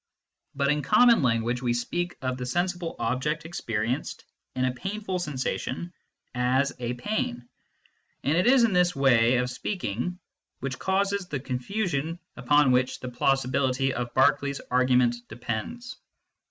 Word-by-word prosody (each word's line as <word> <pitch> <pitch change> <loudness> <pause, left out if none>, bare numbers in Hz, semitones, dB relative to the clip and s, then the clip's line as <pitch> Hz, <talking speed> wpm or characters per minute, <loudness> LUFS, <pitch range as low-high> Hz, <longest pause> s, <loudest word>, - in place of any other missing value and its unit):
But 140 0 +1
in 150 0 +1
common 230 - +5
language 120 -1 +1
we 120 -2 0
speak 175 +9 -2
of 130 0 -1
the 125 0 -5
sensible 175 +3 -1
object 150 +6 -1
experienced 120 -5 -3 0.3
in 130 0 +1
a 130 - 0
painful 195 +5 -4
sensation 155 +3 -3 0.4
as 130 +2 +1
a 120 0 -2
pain, 125 - -3 0.8
and 145 - +2
it 180 +6 +3
is 255 -1 +6
this 180 -5 +3
way 125 -3 +4
of 125 0 0
speaking 175 - -3 0.4
which 135 0 -4
causes 195 0 0
the 145 -5 -3
confusion 155 - -2 0.2
upon 135 +2 +3
which 125 +1 +1
the 125 - -6
plausibility 135 +1 +1
of 120 -1 -3
Berkeley 140 +1 +4
s 140 - -4
argument 125 -1 +3
depends. 120 - -5
135 Hz, 140 wpm, -26 LUFS, 125-175 Hz, 0.8 s, is